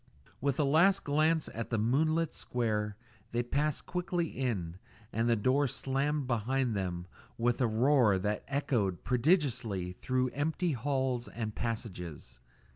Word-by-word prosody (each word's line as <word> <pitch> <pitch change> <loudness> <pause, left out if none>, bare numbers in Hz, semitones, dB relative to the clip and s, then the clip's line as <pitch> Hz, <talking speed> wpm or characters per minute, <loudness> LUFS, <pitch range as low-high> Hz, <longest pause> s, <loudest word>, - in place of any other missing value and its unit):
With 140 +1 0
a - - +4
last 170 +8 +4
glance 155 +2 +2
at 115 0 -4
the 115 - 0
moonlit 155 +8 +2
square, 105 -4 -2 0.4
they 120 +1 +1
passed 145 +4 -1
quickly 175 -2 -1
in, 95 -10 -2 0.4
and 115 +2 +1
the 115 - +4
door 130 +6 +2
slammed 140 +3 -1
behind 125 0 0
them 90 -3 -2 0.3
with 120 +2 +1
a 125 - +4
roar 115 -2 +4
that 105 +2 -1
echoed 120 - 0
prodigiously 125 - +1
through 130 +7 0
empty 160 +6 -1
halls 130 -2 -1
and 110 -2 -4
passages. 90 - -5
125 Hz, 135 wpm, -31 LUFS, 110-145 Hz, 0.4 s, a